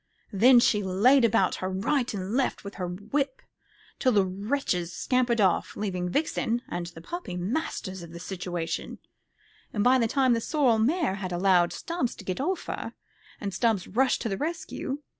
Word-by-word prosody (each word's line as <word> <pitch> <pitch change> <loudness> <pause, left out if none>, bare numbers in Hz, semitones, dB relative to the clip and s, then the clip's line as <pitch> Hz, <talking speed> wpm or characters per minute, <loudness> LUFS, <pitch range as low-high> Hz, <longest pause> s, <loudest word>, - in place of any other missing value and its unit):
Then 240 +5 +7
she 210 -3 +3
laid 210 +8 +4
about 225 -4 +3
her 185 - -1
right 240 +7 0
and 195 0 -4
left 265 +1 0
with 200 0 -7
her 180 - -1
whip 270 - -2 0.6
till 255 - +3
the 200 -4 +4
wretches 190 -2 -2
scampered 245 +5 +1
off, 190 -4 +2
leaving 180 -4 -2
Vixen 240 - 0
and 175 0 -4
the 170 -1 -11
puppy 345 - -5
masters 190 - -3
of 170 -1 -10
the 170 - -8
situation; 175 -3 -4 0.7
and 205 - 0
by 255 +2 +5
this 230 -2 +1
time 260 -3 +3
the 230 - 0
sorrel 255 -5 +2
mare 285 - +2
had 185 -2 -4
allowed 175 -1 +3
Stubbs 335 -8 -3
to 195 - -12
get 185 +6 -2
off 370 +6 -1
her, - - -5 0.5
and 200 -2 -4
Stubbs 215 -2 +1
rushed 255 +6 +1
to 230 - -1
the 195 - -2
rescue. 300 - -4
210 Hz, 180 wpm, -27 LUFS, 185-260 Hz, 0.7 s, Then